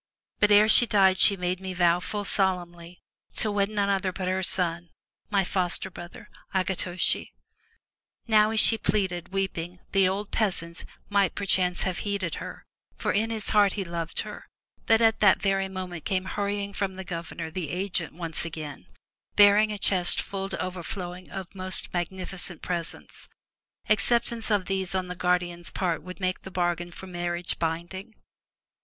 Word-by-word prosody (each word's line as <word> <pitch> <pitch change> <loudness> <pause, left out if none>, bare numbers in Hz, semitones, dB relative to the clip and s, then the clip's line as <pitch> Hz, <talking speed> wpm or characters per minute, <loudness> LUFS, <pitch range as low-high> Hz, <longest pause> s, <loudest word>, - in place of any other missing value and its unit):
But 205 - +4
ere 210 +1 +7
she 240 +2 +6
died 190 -3 +4
she 200 - +6
made 180 0 -1
me 190 -1 -6
vow 175 -1 +4
full 205 +3 -4
solemnly 175 -3 -2 0.3
to 215 - +2
wed 200 0 +1
none 205 -2 0
other 190 -1 0
but 185 0 -4
her 185 +1 0
son, 175 -2 +1 0.4
my 200 -2 +2
foster 185 0 -2
brother, 185 +6 -10 0.3
Akitoshi/* 185 -1 0 0.9
Now 215 -1 +5
as 220 0 +2
she 225 +1 +6
pleaded, 185 -4 -1
weeping, 180 -2 -3
the 195 -2 +4
old 200 +2 -3
peasant, 175 -6 -1 0.2
might, 200 -3 +2
per 200 - -3
chance, 180 -2 +1
have 185 -1 -2
heeded 200 -5 -2
her, - - -8 0.3
for - - -1
in 220 +3 +1
his 220 -2 -4
heart 205 -2 +5
he 200 -2 -3
loved 170 -1 -3
her, - - -9 0.4
but 225 0 +5
at 225 -1 +4
that 200 -2 +5
very 195 0 0
moment 185 -3 -6
came 185 -1 -1
hurrying 200 +1 -2
from 195 -2 -2
the 190 - -6
governor 170 -2 -6
the 170 -3 -4
agent 180 0 -2
once 165 -2 -3
again, 155 -3 -7 0.5
bearing 205 +1 +6
a 210 - -3
chest 185 -3 +3
full 195 -1 -4
to 180 - -5
overflowing 180 0 -5
of 190 -3 -7
most 185 -1 -1
magnifi 185 +1 -4
cent 175 -2 -4
presents. 170 -2 -5 0.6
Acceptance 235 +1 +3
of 205 -3 +2
these 190 -1 -2
on 185 -1 -1
the 180 - -4
guardian's 175 -1 -1
part 175 -4 -1
would 185 +1 -10
make 185 -1 -1
the - - -9
bargain 175 -1 -1
for 190 - -10
marriage 175 -1 -3
binding. 175 +6 -4
185 Hz, 170 wpm, -27 LUFS, 175-200 Hz, 0.9 s, ere